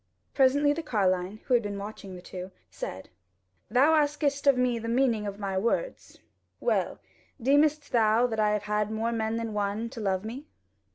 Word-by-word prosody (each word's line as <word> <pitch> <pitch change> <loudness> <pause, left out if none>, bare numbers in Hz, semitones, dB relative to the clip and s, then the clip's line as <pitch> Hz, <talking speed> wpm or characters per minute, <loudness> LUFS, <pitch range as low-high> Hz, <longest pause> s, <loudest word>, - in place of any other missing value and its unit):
Presently 285 +2 +4
the 330 - -4
carline, 195 - 0
who 255 - 0
had 240 - +5
been 205 -2 -4
watching 200 -1 -8
the 180 - -11
two, 185 0 -7 0.2
said: 95 - -7 0.6
"Thou 265 +8 +4
askest 290 -2 +1
of 280 - +7
the 245 -2 0
meaning 235 -4 +1
of 200 0 -5
my 195 -2 -2
words; 365 - -2 0.4
well, - - 0 0.4
deemest 290 +4 +2
thou 225 0 +4
that 225 -3 -2
I 210 -1 +3
have 210 -1 0
had 210 0 -1
more 220 +2 -1
men 220 -1 -1
than 230 -1 -3
one 210 +3 -2
to 255 - -8
love 195 -1 -1
me?" 255 +7 -7
225 Hz, 175 wpm, -28 LUFS, 205-270 Hz, 0.6 s, of